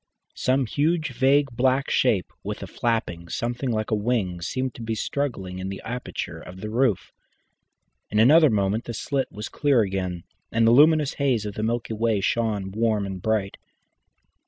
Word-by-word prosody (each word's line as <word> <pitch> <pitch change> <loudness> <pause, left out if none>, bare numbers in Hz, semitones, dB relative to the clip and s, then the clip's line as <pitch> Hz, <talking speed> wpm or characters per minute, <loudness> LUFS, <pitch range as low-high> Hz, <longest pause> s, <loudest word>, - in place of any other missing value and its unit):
Some 130 +1 +1
huge 155 +5 0
vague 135 +2 +3
black 130 +3 +1
shape, 110 -8 +1
with - - -5
a - - -4
flapping 100 -8 -2
something 120 +3 -2
like 110 -1 -2
a - - +3
wing, 105 -5 -1
seemed 130 +6 -2
to - - -10
be 115 0 -2
struggling 105 -9 -3
in 95 +1 -4
the 95 - -6
aperture 125 +2 -5
of 90 +1 -11
the 105 +2 -5
roof. 120 -4 +1 1.0
In 105 - -2
another 150 +8 +7
moment 105 +1 0
the 120 - -5
slit 135 +2 -2
was 105 - -6
clear 140 -5 +2
again, 95 -4 -2 0.3
and 115 0 +3
the 115 - +6
luminous 150 +2 +5
haze 125 -6 +1
of 105 - -4
the 105 - -4
Milky 115 +1 -1
Way 110 -1 +1
shone 105 -2 -1
warm 110 -1 0
and 95 -2 -6
bright. 105 -2 -1
115 Hz, 175 wpm, -24 LUFS, 100-130 Hz, 1.0 s, another